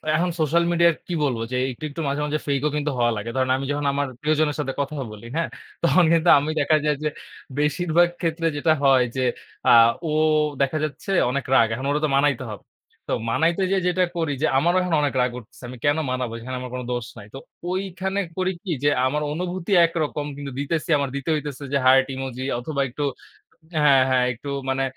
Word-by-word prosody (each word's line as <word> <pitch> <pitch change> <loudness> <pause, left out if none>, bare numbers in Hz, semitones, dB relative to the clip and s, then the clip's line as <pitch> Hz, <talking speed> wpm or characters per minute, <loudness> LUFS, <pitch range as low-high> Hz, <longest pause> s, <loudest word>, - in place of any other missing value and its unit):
এখন 175 +3 +1
সোশ্যাল 165 +3 +2
মিডিয়ার 170 -1 +4
কি 175 - -3
বলবো? 125 -5 0
যে - - -1 0.2
একটু, 125 - -11
একটু, 165 +3 -6
মাঝে, 140 +1 -1
মাঝে, 150 +1 -1
ফেইক 140 -1 0
ও - - +1
কিন্তু 150 0 -1
হওয়া 120 -1 +2
লাগে। 110 +3 -5
ধরেন 130 0 +1
আমি 135 - -4
যখন 145 0 -2
আমার 145 0 0
প্রিয়জনের 155 -1 +1
সাথে 135 -2 -2
কথা 140 +2 -2 0.2
বলি, 105 +1 -11
হ্যাঁ? 165 - 0 0.3
তখন 175 +2 +5
কিন্তু 165 +1 +3
আমি 145 +2 -3
দেখা 155 +2 +3
যায় 150 -1 +2
যে 150 - +1 0.5
বেশিরভাগ 170 +3 +2
ক্ষেত্রে 165 -1 0
যেটা 155 +2 +3
হয় 135 -2 +5
যে 130 - -1 0.5
আ - - +7 0.4
ও - - -1 0.5
দেখা 140 +3 +1
যাচ্ছে 155 +6 -4 0.2
অনেক 140 +1 -2
রাগ। 115 -3 +6
এখন 130 +4 -4
ওরে 145 - +1
তো - - 0
মানাইতে 140 -2 +2
হবে। 105 - -9 0.4
তো - - -4 0.2
মানাইতে 165 +10 +1
যেয়ে 190 -2 +1
যেটা 185 +1 +2
করি 165 -3 0
যে - - +3
আমারও 175 +6 +3
এখন 180 -2 -2
অনেক 145 -1 0
রাগ 125 0 +1
উঠছে। 110 - -18
আমি 125 - -8
কেন 145 +1 +3
মানাবো? 125 -2 -2
এখানে 130 +3 -6
আমার 125 - -6
কোন 125 - -3
দোষ 120 -2 -3
নাই। 100 - -10
তো - - -7 0.3
ঐখানে 190 +1 -2 0.2
করি 185 0 +1
কি 190 - -4
যে 145 - +5 0.2
আমার 150 +3 0
অনুভূতি 180 +3 -4
একরকম, 155 -3 -2
কিন্তু 140 -1 -6
দিতেছি 155 +3 -2
আমার 140 -2 -1
দিতে 140 +2 -4
হইতেছে 145 -2 -5
যে - - +4
হার্ট 130 0 +6
ইমোজি 130 -1 -5 0.2
অথবা 140 +2 -3
একটু 145 +4 -3 0.8
হ্যাঁ, 140 -3 +6
হ্যাঁ, 125 -1 +3
একটু 125 +5 -9 0.2
মানে 135 0 0
145 Hz, 210 wpm, -23 LUFS, 130-165 Hz, 0.8 s, আ